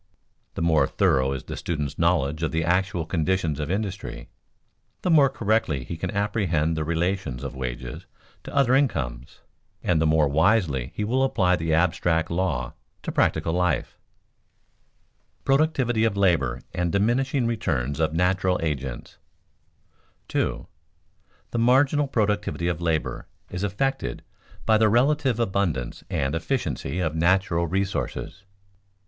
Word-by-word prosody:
The - - -2
more 80 -2 +3
thorough 65 0 +2
is 70 -2 -4
the - - -6
student's 75 -4 -3
knowledge 80 -3 +1
of 80 - 0
the 80 0 0
actual 90 0 0
conditions 80 -2 0
of 75 0 -3
industry, 100 - -4 0.7
the 180 - +1
more 145 -4 +6
correctly 100 - 0
he 85 - -6
can - - -4
apprehend 95 -7 0
the 80 - -1
relations 85 -5 -1
of 70 - -5
wages 65 -1 -6 0.4
to - - -9
other 135 -2 +4
incomes, 65 - -1 0.4
and 85 -3 +2
the 80 - +3
more 80 -1 +4
wisely 75 - +2
he 105 - -2
will 125 +5 +1
apply 95 -9 +2
the 80 -1 0
abstract 85 -1 +1
law 85 -9 -1 0.3
to - - -3
practical 80 +1 +1
life. 90 0 0 1.4
[Sidenote: - - -39
Productivity 135 -5 +2
of 110 -3 +1
labor 75 -11 +2
and 90 -1 -1
diminishing 120 - +1
returns 75 - -1
of 80 -1 +2
natural 90 +2 +1
agents] 70 -5 -4 1.1
2. - - -1 0.9
_The 120 - -1
marginal 135 +4 +3
productivity 105 -7 0
of 85 -1 -2
labor 80 -2 -1 0.2
is 90 - -4
affected 105 - -2 0.4
by 110 -1 +4
the 110 -1 +4
relative 130 +1 +2
abundance 95 - -1
and 70 +1 -1
efficiency 80 - -2
of 80 -4 0
natural 85 0 +2
resources. 95 +2 -3
90 Hz, 135 wpm, -25 LUFS, 80-105 Hz, 1.4 s, more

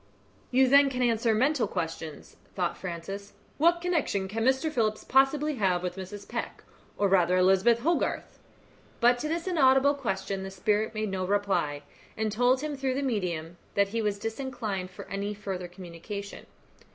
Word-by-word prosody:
"You 260 +1 +4
then 280 +1 +6
can 255 -1 -1
answer 230 -1 +2
mental 265 +3 +2
questions," 165 -3 -5 0.2
thought 180 -3 -1
Francis. 195 +3 -6 0.3
"What 340 +2 +4
connection 310 - 0
can 225 +3 -3
Mr. 265 +5 +2
Phillips 215 -6 0
possibly 275 +2 +2
have 185 -4 +1
with 180 -1 -3
Mrs. 195 +2 -8
Peck, - - -5 0.3
or 200 - +2
rather 180 -2 +3
Elizabeth 190 +6 +4
Hogarth?" 335 +6 -1 0.6
But 245 +1 +4
to 305 - -2
this 335 +2 -2
inaudible 280 -5 +4
question 195 -8 -3
the 190 - -5
spirit 210 +3 0
made 215 -1 -1
no 190 -1 -2
reply, 190 -7 0 0.3
and 220 -1 0
told 245 +4 +3
him, 300 -1 -3
through 265 -1 -1
the 280 - -1
medium, 175 -9 -2 0.2
that 200 0 +3
he 230 +2 -1
was 210 -2 0
disinclined 225 -4 -4
for 185 - -11
any 200 +1 -3
further 190 -3 -5
communication. 180 +3 -8
210 Hz, 165 wpm, -28 LUFS, 190-265 Hz, 0.6 s, then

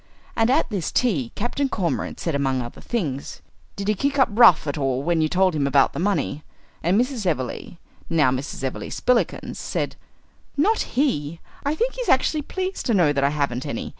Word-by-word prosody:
And 225 0 +2
at 260 - +3
this 190 -6 -2
tea 160 - +1
Captain 265 +5 -1
Cormorant 185 -9 -2
said, 165 - -2
among 135 -2 0
other 120 -1 -7
things, 150 - -4 0.3
"Did 200 0 -5
he 210 - +3
kick 280 +7 -1
up 265 - +4
rough 215 -8 +6
at 145 - -2
all 135 -3 -1
when 170 0 +1
you 155 - +2
told 185 +1 +2
him 140 -2 +1
about 140 -1 +3
the - - -4
money?" 180 -5 -1 0.4
And 180 +6 +2
Mrs. 245 -5 -1
Everleigh, 140 +1 -3 0.3
now 155 -6 +3
Mrs. 130 +1 -4
Everleigh 130 - -3
Spillikins, 250 -2 0
said, - - -3 0.6
"Not 410 - +1
he! 165 - 0 0.2
I 285 +2 0
think 485 +7 0
he - - -5
is - - -3
actually 310 - +3
pleased 375 +5 -4
to 235 - +2
know 165 -6 +4
that 140 -1 0
I 140 - +4
haven't 140 -4 -1
any. - - -4
175 Hz, 195 wpm, -23 LUFS, -, 0.6 s, rough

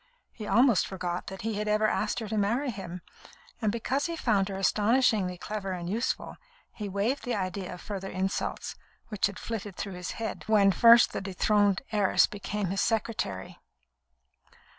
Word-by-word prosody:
He 215 -3 -8
almost 240 -2 +4
forgot 180 -2 -4
that 190 0 -7
he 225 0 -1
had 210 - -2
ever 215 +1 +2
asked 215 0 0
her 220 - -4
to 220 - -3
marry 235 +7 +1
him; 185 -4 -7 0.6
and 215 -2 +2
because 260 +6 -1
he 335 - -3
found 205 -10 +1
her 195 - -4
astonishingly 210 -2 +2
clever 195 0 -4
and 175 -1 -5
useful, 220 +7 -2 0.4
he 210 -3 -5
waived 205 +8 -1
the 245 - -1
idea 185 -1 -3
of 180 - -8
further 195 -2 -5
insults 190 +1 -2 0.4
which 210 -4 +1
had 200 - -8
flitted 210 -4 -5
through 200 0 -5
his 180 0 -5
head 225 -1 -5
when 205 -3 +5
first 230 +5 +7
the - - -3
dethroned 200 +2 +2
heiress 205 -3 +4
became 205 -2 -4
his 195 - 0
secretary. 215 - -2
205 Hz, 170 wpm, -28 LUFS, 190-225 Hz, 0.6 s, first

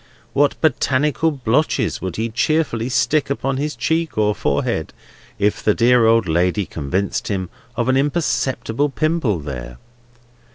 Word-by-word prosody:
What 145 0 +2
botanical 150 +1 +2
blotches 140 +1 0
would 95 -2 -4
he 115 +1 -2
cheerfully 125 -1 0
stick 125 +5 +1
upon 135 -1 -1
his 150 +2 -2
cheek, 160 -5 -1
or 105 -1 +2
forehead, - - -1 0.4
if 105 +1 0
the 105 - +2
dear 120 -1 +4
old 115 -2 +3
lady 90 +5 +1
convicted 90 +7 -2
him 95 -3 -3 0.2
of 120 0 -1
an 130 - +3
imperceptible 140 -3 0
pimple 155 - 0
there! 60 -4 -7
120 Hz, 135 wpm, -20 LUFS, 105-145 Hz, 0.4 s, dear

